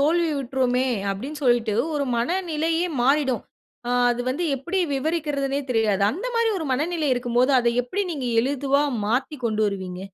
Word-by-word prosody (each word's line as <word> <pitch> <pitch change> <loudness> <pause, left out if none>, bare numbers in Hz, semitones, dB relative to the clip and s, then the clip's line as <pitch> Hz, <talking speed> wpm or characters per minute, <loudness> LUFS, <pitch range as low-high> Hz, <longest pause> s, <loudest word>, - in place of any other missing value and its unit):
தோல்வியுற்றோமே 275 -5 +1 0.2
அப்டின்னு 270 +10 -5
சொல்லிட்டு 240 -4 +2 0.2
ஒரு 290 -1 0
மனநிலையே 330 +4 0 0.2
மாறிடும். 265 -2 +2 0.5
ஆ - - 0 0.2
அது 240 0 -1
வந்து 290 +7 -1
எப்படி 345 +9 -3 0.2
விவரிக்கிறதுனே 280 -2 -1
தெரியாது. 215 -4 +2
அந்த 385 - -5
மாரி 465 0 +2
ஒரு 325 - -4
மனநிலை 310 +3 0
இருக்கும் 245 -1 -3
போது 255 +3 +4
அத 240 -1 +2
எப்டி 250 +12 -3
நீங்க 275 -5 -4
எளிதில் 275 +2 +1 0.2
மாத்தி 260 +7 -1
கொண்டு 220 -2 0
வருவீங்க? 185 -3 -4
275 Hz, 150 wpm, -24 LUFS, 245-315 Hz, 0.5 s, போது